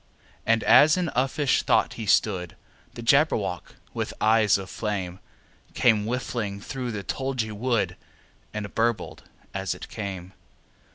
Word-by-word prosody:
And 115 Hz, 0 st, +3 dB
as 145 Hz, +9 st, +6 dB
in 180 Hz, -3 st, 0 dB
uffish 135 Hz, +2 st, +2 dB
thought -, -, +2 dB
he 110 Hz, -3 st, -6 dB
stood, 95 Hz, -4 st, +1 dB, 0.4 s
The 120 Hz, -, -7 dB
Jabberwock, 115 Hz, -, +1 dB, 0.2 s
with -, -, -4 dB
eyes 110 Hz, -2 st, +4 dB
of 95 Hz, -1 st, -7 dB
flame, 95 Hz, -3 st, -4 dB, 0.6 s
Came 110 Hz, -4 st, +3 dB
whiffling 115 Hz, -4 st, -3 dB
through 125 Hz, +4 st, -5 dB
the 105 Hz, -3 st, -5 dB
tulgey 130 Hz, -2 st, -2 dB
wood, 115 Hz, +2 st, 0 dB, 0.6 s
And 105 Hz, -1 st, -5 dB
burbled 115 Hz, -4 st, -1 dB, 0.3 s
as -, -, -2 dB
it -, -, -10 dB
came! 95 Hz, -3 st, -6 dB
110 Hz, 130 wpm, -25 LUFS, 100-125 Hz, 0.6 s, as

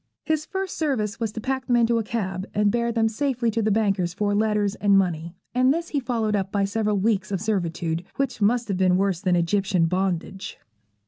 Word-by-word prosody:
His 310 Hz, -1 st, -1 dB
first 385 Hz, -1 st, -4 dB
service 230 Hz, -9 st, -1 dB
was 225 Hz, -3 st, -1 dB
to 225 Hz, -, -5 dB
pack 260 Hz, +3 st, -3 dB
them 245 Hz, -, +3 dB
into 235 Hz, -1 st, +3 dB
a -, -, -1 dB
cab 195 Hz, -3 st, -3 dB
and 205 Hz, 0 st, +3 dB
bear 235 Hz, +1 st, 0 dB
them 225 Hz, -1 st, +2 dB
safely 240 Hz, 0 st, 0 dB
to 225 Hz, +1 st, 0 dB
the 215 Hz, -, +1 dB
bankers 195 Hz, -4 st, +1 dB
for 205 Hz, 0 st, 0 dB
letters 210 Hz, -1 st, +1 dB
and 200 Hz, -2 st, +3 dB
money; 170 Hz, -2 st, -1 dB, 0.2 s
and 255 Hz, +1 st, +4 dB
this 335 Hz, +3 st, -2 dB
he 290 Hz, -, 0 dB
followed 230 Hz, -4 st, -1 dB
up 195 Hz, -1 st, -2 dB
by 200 Hz, -1 st, +1 dB
several 210 Hz, 0 st, 0 dB
weeks 195 Hz, -1 st, 0 dB
of 195 Hz, -, 0 dB
servitude, 175 Hz, -5 st, -1 dB
which 275 Hz, -5 st, -2 dB
must 235 Hz, +3 st, +2 dB
have 195 Hz, -, 0 dB
been 185 Hz, -1 st, +3 dB
worse 190 Hz, -2 st, 0 dB
than 185 Hz, -3 st, +2 dB
Egyptian 180 Hz, 0 st, +1 dB
bondage. 185 Hz, +1 st, -2 dB
210 Hz, 210 wpm, -24 LUFS, 190-235 Hz, 0.2 s, and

